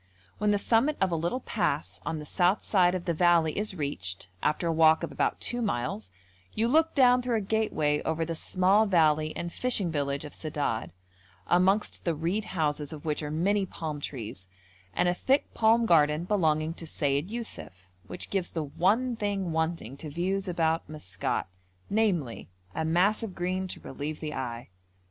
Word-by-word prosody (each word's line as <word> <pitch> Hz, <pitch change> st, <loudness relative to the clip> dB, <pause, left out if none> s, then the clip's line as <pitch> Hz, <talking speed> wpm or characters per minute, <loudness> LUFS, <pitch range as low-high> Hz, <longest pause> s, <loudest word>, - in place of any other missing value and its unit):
When 210 Hz, +1 st, +2 dB
the 205 Hz, -, +3 dB
summit 240 Hz, +8 st, +2 dB
of 190 Hz, -2 st, +2 dB
a -, -, +1 dB
little 170 Hz, +11 st, -1 dB
pass -, -, -1 dB
on 160 Hz, -, -2 dB
the 150 Hz, -, -7 dB
south 180 Hz, +5 st, +2 dB
side 180 Hz, -3 st, +3 dB
of 180 Hz, -1 st, -4 dB
the 170 Hz, -, +1 dB
valley 170 Hz, -2 st, +3 dB
is 210 Hz, -1 st, -2 dB
reached 100 Hz, -, -4 dB
after 155 Hz, +3 st, 0 dB
a 165 Hz, -, +2 dB
walk 160 Hz, 0 st, +5 dB
of -, -, -3 dB
about -, -, 0 dB
two 240 Hz, 0 st, -2 dB
miles, 120 Hz, -, -2 dB, 0.5 s
you 225 Hz, +2 st, +2 dB
look 320 Hz, +5 st, +3 dB
down 250 Hz, -2 st, +5 dB
through 245 Hz, -1 st, -1 dB
a 220 Hz, -, +1 dB
gateway 190 Hz, -8 st, 0 dB
over 160 Hz, 0 st, -1 dB
the 165 Hz, -, -3 dB
small 190 Hz, +6 st, +3 dB
valley 155 Hz, -4 st, +3 dB
and 170 Hz, 0 st, -4 dB
fishing 215 Hz, -9 st, +1 dB
village 140 Hz, -2 st, -2 dB
of 150 Hz, -, -9 dB
Sedad, 145 Hz, -7 st, -2 dB, 0.5 s
amongst 190 Hz, +4 st, +2 dB
the 170 Hz, -2 st, 0 dB
reed 175 Hz, +8 st, -1 dB
houses 150 Hz, -5 st, -1 dB
of 155 Hz, -1 st, -9 dB
which 150 Hz, -1 st, -1 dB
are 150 Hz, -, -4 dB
many 195 Hz, +7 st, +1 dB
palm 155 Hz, -5 st, -5 dB
trees 110 Hz, -9 st, -6 dB, 0.4 s
and 180 Hz, -, +1 dB
a 175 Hz, -, +3 dB
thick 265 Hz, +9 st, +1 dB
palm 230 Hz, +1 st, +4 dB
garden 155 Hz, -4 st, +4 dB
belonging 160 Hz, -5 st, +1 dB
to 165 Hz, -1 st, -8 dB
Sayid 145 Hz, +3 st, 0 dB
Yussuf, 210 Hz, -, -7 dB, 0.2 s
which 180 Hz, -, -6 dB
gives 190 Hz, -3 st, 0 dB
the 160 Hz, -, -1 dB
one 210 Hz, -, +1 dB
thing 200 Hz, -5 st, -2 dB
wanting 160 Hz, -5 st, -2 dB
to 155 Hz, -, -7 dB
views 190 Hz, +5 st, -1 dB
about 165 Hz, -3 st, 0 dB
Maskat, 95 Hz, -, -2 dB, 0.5 s
namely, 185 Hz, -, 0 dB, 0.2 s
a 160 Hz, -, -2 dB
mass 180 Hz, +7 st, +2 dB
of 220 Hz, -5 st, -5 dB
green 185 Hz, +2 st, -2 dB
to -, -, -6 dB
relieve 150 Hz, +3 st, -6 dB
the 155 Hz, -1 st, -4 dB
eye. 120 Hz, -4 st, -5 dB
170 Hz, 180 wpm, -28 LUFS, 150-200 Hz, 0.5 s, walk